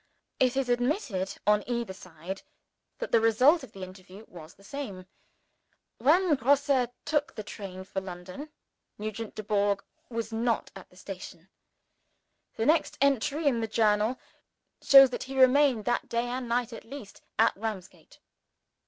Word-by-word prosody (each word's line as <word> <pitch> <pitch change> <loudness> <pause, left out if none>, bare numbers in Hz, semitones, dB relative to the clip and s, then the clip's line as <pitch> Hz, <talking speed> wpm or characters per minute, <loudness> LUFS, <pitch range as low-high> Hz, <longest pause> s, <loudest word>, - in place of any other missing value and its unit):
It 255 0 +2
is 270 -2 +1
admitted, 245 - -1
on 210 0 +4
either 235 -5 -2
side, 185 0 -8 0.6
that - - -5
the 230 - +5
result 250 +9 +5
of 260 -5 -11
the 195 - -8
interview 185 +3 -11
was 165 -2 -12
the 195 - -21
same. 200 -7 -7 0.9
When 320 +7 +4
Grosse 275 -1 +3 0.2
took 295 -1 0
the 215 - -5
train 190 -3 -8
for 190 0 -4
London, 185 - -8 0.5
Nugent 215 +1 -5
Dubourg 205 -1 0 0.3
was 230 -2 -4
not 230 0 0
at - - -11
the - - -22
station. 185 -2 -9 1.1
The 225 - -1
next 315 +3 +2
entry 280 +3 +1
in 245 -5 +2
the 225 - -1
Journal 215 +2 +2 0.6
shows 270 -2 +8
that - - -4
he 265 0 -4
remained 260 -3 +5
that 240 - -1
day 235 +1 0
and 245 0 -4
night, 240 0 0
at - - -9
least, 240 -4 -10 0.2
at 225 - +4
Ramsgate. 205 -3 -7
225 Hz, 150 wpm, -28 LUFS, 200-265 Hz, 1.1 s, shows